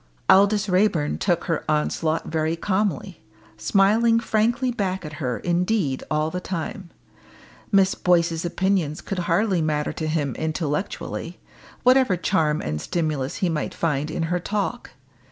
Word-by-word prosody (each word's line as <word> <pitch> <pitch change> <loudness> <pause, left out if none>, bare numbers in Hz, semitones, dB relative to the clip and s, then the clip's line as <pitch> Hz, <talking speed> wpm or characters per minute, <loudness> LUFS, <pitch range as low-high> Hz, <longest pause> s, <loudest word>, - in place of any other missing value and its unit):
Aldous 200 +2 +5
Raeburn 180 -5 +1
took 175 -4 +1
her 165 -3 -1
onslaught 155 +1 0
very 160 0 -1
calmly, 195 0 -2 0.3
smiling 205 - +3
frankly 230 +3 +1
back 190 -6 -2
at 150 - -7
her 125 -3 -1
indeed 175 -5 0
all 155 +1 0
the 180 - -3
time. 185 +1 -5 0.8
Miss 195 -2 +4
Boyce's 170 -2 +1
opinions 175 -3 0
could 195 - -4
hardly 185 0 +2
matter 150 -1 -1
to 155 - -4
him 150 -4 -1
intellectually, 160 +2 -3 0.4
whatever 255 -6 +4
charm 160 -4 +1
and 75 0 -3
stimulus 155 - -2
he - - +2
might 155 -2 -3
find 150 -2 -1
in 160 - -2
her 175 +2 0
talk. 210 +6 -3
175 Hz, 135 wpm, -23 LUFS, 155-195 Hz, 0.8 s, Aldous